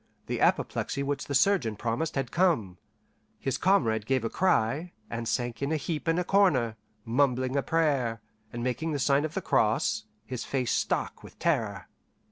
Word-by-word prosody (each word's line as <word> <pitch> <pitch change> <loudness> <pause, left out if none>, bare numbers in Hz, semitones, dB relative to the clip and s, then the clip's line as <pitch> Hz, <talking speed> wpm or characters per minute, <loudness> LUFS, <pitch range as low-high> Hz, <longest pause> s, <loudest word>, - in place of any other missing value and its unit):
the - - -3
apoplexy 140 - +1
which 140 0 -2
the 140 - -3
surgeon 135 - +3
promised 120 +8 -2
had 135 -3 -2
come), 120 - +1 0.6
his 135 - -2
comrade 115 - +2
gave 130 -3 +1
a 115 - -2
cry, 155 -1 +1 0.2
and 115 0 -3
sank 120 0 -2
in 140 +2 -1
a 160 - +2
heap 155 +1 -4
in 165 +1 +2
a 180 - +1
corner, 155 - +3 0.3
mumbling 130 +1 +1
a 140 - +3
prayer, 140 -8 +1 0.3
and 120 0 -5
making 150 +6 -1
the - - 0
sign 140 +1 +2
of 155 - -6
the - - -2
cross, - - +1 0.2
his 125 +1 -5
face 130 -3 -1
stark - - -1
with - - -14
terror. 110 - -1
135 Hz, 175 wpm, -28 LUFS, 115-160 Hz, 0.6 s, surgeon